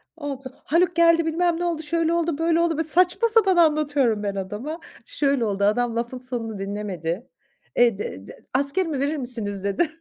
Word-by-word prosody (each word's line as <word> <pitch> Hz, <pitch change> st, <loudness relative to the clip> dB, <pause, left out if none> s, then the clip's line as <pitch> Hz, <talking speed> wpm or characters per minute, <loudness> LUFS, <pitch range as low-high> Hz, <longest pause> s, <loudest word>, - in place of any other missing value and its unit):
Oldu. 285 Hz, -4 st, -6 dB, 0.2 s
"Haluk 345 Hz, +3 st, +2 dB
geldi, 335 Hz, -1 st, +4 dB
bilmem 330 Hz, +1 st, +1 dB
ne 350 Hz, -, -1 dB
oldu, 330 Hz, -2 st, -2 dB
şöyle 330 Hz, +1 st, 0 dB
oldu, 335 Hz, -3 st, 0 dB
böyle 330 Hz, +1 st, +2 dB
oldu." 330 Hz, -2 st, +1 dB
Böyle 320 Hz, -, 0 dB
saçma 360 Hz, +8 st, +3 dB
sapan 425 Hz, -5 st, +4 dB
anlatıyorum 290 Hz, -9 st, +2 dB
ben 200 Hz, -1 st, -2 dB
adama. 210 Hz, -, -5 dB, 0.3 s
Şöyle 275 Hz, -5 st, 0 dB
oldu 200 Hz, -1 st, -1 dB
adam 230 Hz, +3 st, +1 dB
lafın 240 Hz, +2 st, -3 dB
sonunu 245 Hz, -3 st, -4 dB
dinlemedi. 195 Hz, -2 st, -4 dB, 0.5 s
"Eee, 235 Hz, -4 st, +4 dB
d 95 Hz, -, -6 dB
d -, -, -9 dB, 0.2 s
askerimi 285 Hz, +2 st, 0 dB
verir 290 Hz, +2 st, 0 dB
misiniz?" 220 Hz, -7 st, -3 dB
dedi. 200 Hz, -, +1 dB
280 Hz, 175 wpm, -23 LUFS, 220-330 Hz, 0.5 s, geldi